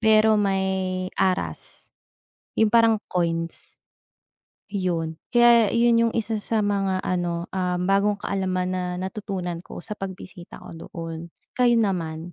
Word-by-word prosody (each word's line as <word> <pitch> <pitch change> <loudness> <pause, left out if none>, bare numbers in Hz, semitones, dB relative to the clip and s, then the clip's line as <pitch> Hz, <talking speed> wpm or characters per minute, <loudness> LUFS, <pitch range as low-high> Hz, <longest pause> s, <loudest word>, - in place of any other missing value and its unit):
pero 220 0 +5
may 190 -2 -1
aras, 185 -1 -2 0.6
'yong 220 -1 +3
parang 230 -1 +5 0.2
coins, 165 -1 -3 0.9
'yon. 170 -5 -2
Kaya 240 -3 +6
'yon 235 0 +3
'yong - - -5
isa 220 -1 -1
sa 215 0 +1
mga 195 -2 0
ano, 175 -2 -1
ah, 180 -1 -1
bagong 195 +3 +2
kaalaman 185 -2 -1
na 185 0 -1
natutunan 185 -2 -4
ko 175 - -10
sa - - -6
pagbisita 185 -2 -8
ko - - -11 0.2
doon. 165 0 -7 0.2
Kayo 245 -1 +3
naman? 175 -6 -1
190 Hz, 125 wpm, -24 LUFS, 180-215 Hz, 0.9 s, Kaya